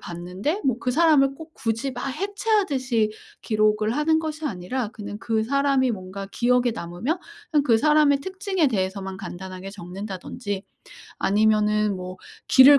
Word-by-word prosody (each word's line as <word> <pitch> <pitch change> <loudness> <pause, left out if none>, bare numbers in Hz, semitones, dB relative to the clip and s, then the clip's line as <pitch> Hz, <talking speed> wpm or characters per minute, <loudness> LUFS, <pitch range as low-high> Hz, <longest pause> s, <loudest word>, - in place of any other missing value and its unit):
봤는데 180 - -3
뭐 260 -3 +2
그 250 - -1
사람을 290 -3 +4
꼭 320 +2 -11
굳이 230 +1 -1
막 250 +1 -5
해체하듯이 300 - +1 0.3
기록을 215 0 +2
하는 315 +2 +3
것이 310 -1 -3
아니라 215 +2 -3
그냥 210 -1 -7
그 225 -1 0
사람이 275 +1 +2
뭔가 195 -1 -5
기억에 245 0 +3
남으면 215 - -3 0.3
그냥 300 -3 +4
그 230 -5 +5
사람의 300 0 +4
특징에 380 -2 0
대해서만 190 -2 -2
간단하게 190 0 -7
적는다든지. 195 +2 -5 0.6
아니면은 210 0 +3
뭐 185 0 -7 0.3
길을 280 +2 +9
235 Hz, 330 characters per minute, -24 LUFS, 200-285 Hz, 0.6 s, 길을